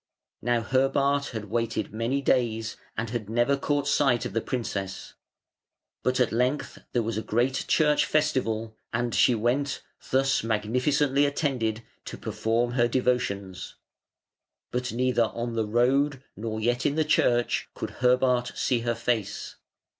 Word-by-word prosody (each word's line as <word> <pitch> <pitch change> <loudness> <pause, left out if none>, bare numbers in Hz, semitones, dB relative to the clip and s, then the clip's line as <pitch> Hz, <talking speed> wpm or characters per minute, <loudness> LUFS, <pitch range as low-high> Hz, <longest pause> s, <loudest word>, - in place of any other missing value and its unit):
Now 120 0 +1
Herbart 135 +3 +1
had 110 -3 -5
waited 115 -3 -1
many 120 +5 -1
days, 115 -4 +1 0.2
and 115 -2 -2
had 115 -4 -4
never 120 +4 +2
caught 145 0 -1
sight 135 -6 +2
of - - -4
the 115 - 0
princess; 100 -7 -4 0.9
but 130 0 0
at 125 - +3
length 125 +5 -1
there 120 - +1
was 110 -1 -2
a - - -3
great 125 +4 0
church 150 -2 +3
festival, 115 -7 0 0.2
and 120 +1 -1
she 125 - +4
went, 125 +6 0 0.3
thus 135 -1 +2
magnificently 125 +6 +1
attended, 125 -7 -1 0.2
to - - -7
perform 115 +2 -1
her 120 -1 +3
devotions. 120 -7 -1 1.0
But 125 0 -2
neither 125 -1 +2
on 115 +1 -4
the 110 -2 -1
road 135 +5 +2
nor 110 +1 -4
yet 120 +3 0
in 145 - +1
the 155 -1 +2
church 120 -5 +2
could - - -6
Herbart 125 0 +3
see 125 -3 +1
her 120 0 -1
face. 110 -5 -2
120 Hz, 145 wpm, -27 LUFS, 115-135 Hz, 1.0 s, she